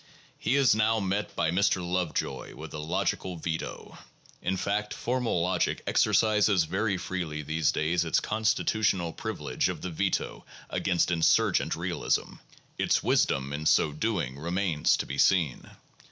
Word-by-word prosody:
He 135 - +1
is 135 -5 +5
now 110 +1 +2
met 100 +1 -2
by 80 - +1
Mr. 90 -1 +1
Lovejoy 90 -2 -2
with - - -9
a 75 - -5
logical 85 +3 -2
veto. 80 0 -5 0.4
In 95 +1 -1
fact, 105 +2 -2
formal 120 -8 -1
logic 90 +2 0
exercises 105 -4 +3
very 100 +4 -1
freely 85 -5 -4
these 80 +1 +1
days 85 +3 0
its 80 - +2
constitutional 105 -4 0
privilege - - -2
of - - -5
the 90 - -4
veto 80 - -2 0.3
against 90 -1 +1
insurgent 85 -2 +2
realism; - - -2 0.4
its - - +2
wisdom 70 +1 +1
in 75 +2 -2
so 75 - +4
doing 75 - -2
remains 85 -1 +1
to - - -3
be 70 +1 -5
seen. 85 -9 +2
90 Hz, 140 wpm, -28 LUFS, 80-105 Hz, 0.4 s, is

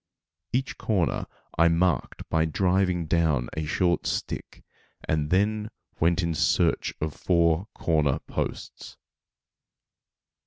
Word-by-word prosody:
Each 130 +2 -2
corner 95 -7 0 0.3
I 85 - +7
marked 85 -2 0
by 80 0 +2
driving 90 +1 +1
down 80 -7 +1
a 80 -1 -3
short 85 +2 +1
stick, - - -4 0.4
and 75 -1 0
then 105 +4 +1 0.3
went 85 +3 +2
in 85 -1 0
search - - +1
of 80 -1 -2
four 85 +3 +2
corner 75 -5 +1
posts. - - -5
85 Hz, 110 wpm, -26 LUFS, 80-95 Hz, 0.4 s, I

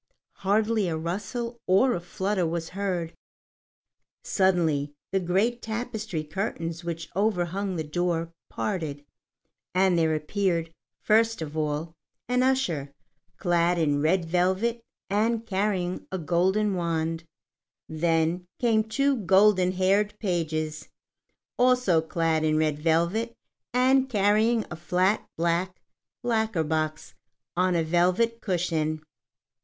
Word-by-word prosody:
Hardly 210 +1 +1
a 160 -2 -1
rustle 210 +8 -4
or 220 +8 +4
a - - -1
flutter 185 +1 -1
was 165 0 -3
heard. 180 -4 -3 1.1
Suddenly 165 - +1 0.2
the 195 - +2
great 195 +7 0
tapestry 220 -6 -4
curtains 165 0 -4
which 165 -1 -5
overhung 195 -1 0
the 160 - -2
door 165 +1 -1 0.2
parted, 155 -8 -3 0.7
and 185 -2 +4
there 160 -1 +2
appeared, 165 0 -1 0.3
first 225 +1 +3
of 155 0 -7
all, 155 +1 -2 0.3
an 250 0 +2
usher, 185 - 0 0.5
clad 175 0 +2
in 145 -3 +1
red 170 +3 +2
velvet 190 +7 +1 0.3
and 220 +3 0
carrying 190 -3 -1
a 190 - -2
golden 190 +5 +1
wand; 165 -2 -1 0.6
then 165 +2 0
came 225 -3 +2
two 275 +6 +1
golden 190 -1 +4
haired 200 +3 +1
pages, 155 -5 -2 0.7
also 250 -9 +4
clad 160 -1 0
in 155 0 +2
red 155 -1 +1
velvet 170 +9 +1 0.4
and 260 +2 +3
carrying 215 +1 +2
a - - -4
flat 180 +5 +1
black 170 +2 0 0.4
lacquer 220 -7 +1
box 155 0 -2 0.4
on 180 0 +2
a 165 - +2
velvet 185 +8 +1
cushion. 165 -5 -1
180 Hz, 115 wpm, -26 LUFS, 165-215 Hz, 1.1 s, or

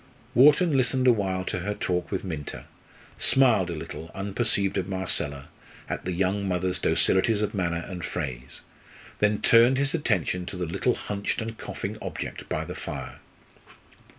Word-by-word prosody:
Wharton 150 +5 +6
listened 130 0 +2
a 125 - +8
while 95 -3 -1
to 90 - -2
her 105 +4 -3
talk 90 -2 -1
with 95 - -2
Minta, 80 -6 -6 0.5
smiled 115 -9 +4
a 85 - -3
little, 80 +1 -7
unperceived 100 0 0
of 95 +1 -4
Marcella, 75 -7 -2 0.4
at - - -4
the 90 - -1
young 95 +3 0
mother's 90 0 0
docilities 105 +3 +2
of 105 - -2
manner 85 -3 -1
and 90 -3 -6
phrase; 65 -4 -5 0.6
then 105 0 +2
turned 120 +3 +6
his 140 0 +1
attention 90 - 0
to 95 - -5
the 90 - -2
little 95 +9 0
hunched 100 -1 -3
and 115 0 -4
coughing - - -5
object - - -6
by - - -1
the - - -6
fire. - - -6
95 Hz, 160 wpm, -26 LUFS, 90-115 Hz, 0.6 s, a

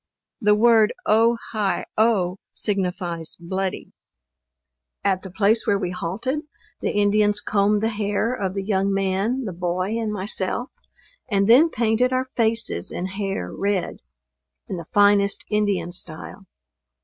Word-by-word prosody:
The 210 -1 +4
word 220 -1 +4
O 230 +2 +4
hi 210 -3 -1
o, 200 -5 +2 0.2
signifies 180 -5 -1
bloody. 190 +2 -4 1.1
At 190 -2 +1
the 190 - -9
place 215 +4 +1
where 200 - +3
we 180 -2 -3
halted, 205 - -3 0.4
the - - -1
Indians 205 0 +2
combed 205 +1 +1
the 225 - +2
hair 210 +2 -1
of 195 -6 -3
the 195 - -2
young 195 -1 0
man, 195 +6 0
the 195 - -4
boy 180 +2 -2
and 220 -2 -2
myself, 205 +4 -2 0.6
and 200 -2 +2
then 265 +9 +7
painted 235 0 +1
our 255 0 0
faces 225 - 0
and 185 +2 -4
hair 195 - -3
red, 200 -2 -1 0.7
in 185 - -4
the 170 - -8
finest 205 -1 +3
Indian 200 -5 0
style. 175 +2 -6
200 Hz, 135 wpm, -23 LUFS, 190-220 Hz, 1.1 s, then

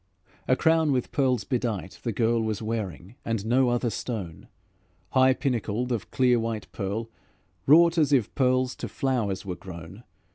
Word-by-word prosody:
A 130 - +4
crown 160 0 +3
with 125 -3 -1
pearls 130 -6 +1
bedight, 110 - -3
the 120 - -2
girl 115 +1 +1
Was 110 -2 -2
wearing, 110 - -5
and 115 -3 -2
no 125 +2 +3
other 120 -1 0
stone; 100 -8 -5 0.6
High 130 0 +4
pinnacled 125 -2 -2
of 115 -5 -2
clear 125 -2 +3
white 115 -2 -3
pearl, 110 +4 -4 0.6
Wrought 165 +3 +6
as 150 -2 +3
if 125 -7 +2
pearls 130 -1 +1
to - - -5
flowers 110 -8 -1
were 95 - -3
grown. 90 +4 -10
115 Hz, 155 wpm, -26 LUFS, 105-130 Hz, 0.6 s, Wrought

